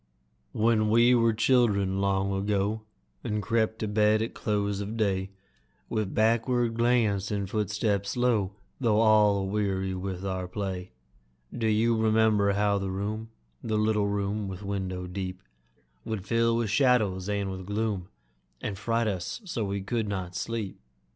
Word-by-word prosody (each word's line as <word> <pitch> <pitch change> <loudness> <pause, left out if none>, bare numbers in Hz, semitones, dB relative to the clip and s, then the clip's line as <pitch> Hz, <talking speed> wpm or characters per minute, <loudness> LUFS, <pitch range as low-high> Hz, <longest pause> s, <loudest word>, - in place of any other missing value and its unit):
When 110 -1 +2
we 120 +3 +5
were 115 -1 +4
children, 110 -5 +2
long 100 0 +1
ago, 100 +2 0 0.4
And 105 -1 -1
crept 110 +2 0
to 110 - -3
bed 105 +1 +3
at 115 - -5
close 105 -2 -1
of 105 +3 -5
day, 95 -3 0 0.6
With 110 -4 -2
backward 115 +2 +2
glance 115 -4 +2
and 100 -2 -2
footstep 105 0 -1
slow, 110 -4 +1 0.3
Though 110 -5 +2
all 105 -2 +5
aweary 95 -1 -1
with 95 0 -4
our 95 -1 -2
play, 95 -1 -4 0.6
Do 115 -2 0
you 110 +2 +3
remember 110 -2 +3
how 100 0 +2
the 95 0 -3
room 105 +4 -3 0.3
The 110 -1 -1
little 105 -1 +2
room 100 0 -1
with 95 +1 -7
window 95 -2 -3
deep 90 0 -5 0.6
Would 105 -4 -4
fill 115 0 +2
with 115 -3 -1
shadows 110 -7 +2
and 100 -1 -1
with 95 -1 -7
gloom, 105 -3 -2 0.5
And 100 -2 -4
fright 115 +2 0
us 95 - -3
so 120 - -2
we 100 0 -2
could 110 +1 -1
not 95 -3 -4
sleep? 110 0 -4
105 Hz, 150 wpm, -28 LUFS, 95-110 Hz, 0.6 s, we